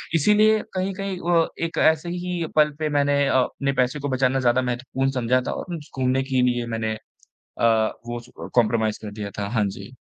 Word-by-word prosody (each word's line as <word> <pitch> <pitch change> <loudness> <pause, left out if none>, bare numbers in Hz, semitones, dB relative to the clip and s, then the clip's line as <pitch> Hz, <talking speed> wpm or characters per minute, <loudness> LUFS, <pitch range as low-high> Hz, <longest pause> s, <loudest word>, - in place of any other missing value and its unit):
इसलिए 215 +6 +4
कहीं-कहीं 190 0 -3
व 165 -1 +4 0.2
एक 165 - -6
ऐसे 160 +2 +3
ही 175 -1 -3
पल 150 -1 +5
पे 155 -1 0
मैंने 145 -1 +2
अ, - - +1
अपने 140 +2 0
पैसे 125 +3 0
को 145 0 -3
बचाना 130 0 +1
ज़्यादा 125 0 +3
महत्वपूर्ण 125 +2 -2
समझा 125 -1 +1
था। - - -1
ओ - - -5
उम्स 160 -4 -6
घूमने 130 +1 +2
के 130 -1 0
लिए 120 -1 -2
मैंने 110 -1 -1 0.4
अ, - - -6 0.4
वो 120 0 -4
अ, 120 +1 -10
कंप्रोमाइज़ 110 -2 +2
कर 105 - -6
दिया 105 -1 -6
था। 100 -1 -2
हाँ 105 - +2
जी। 110 - -8
135 Hz, 195 wpm, -23 LUFS, 120-160 Hz, 0.4 s, पल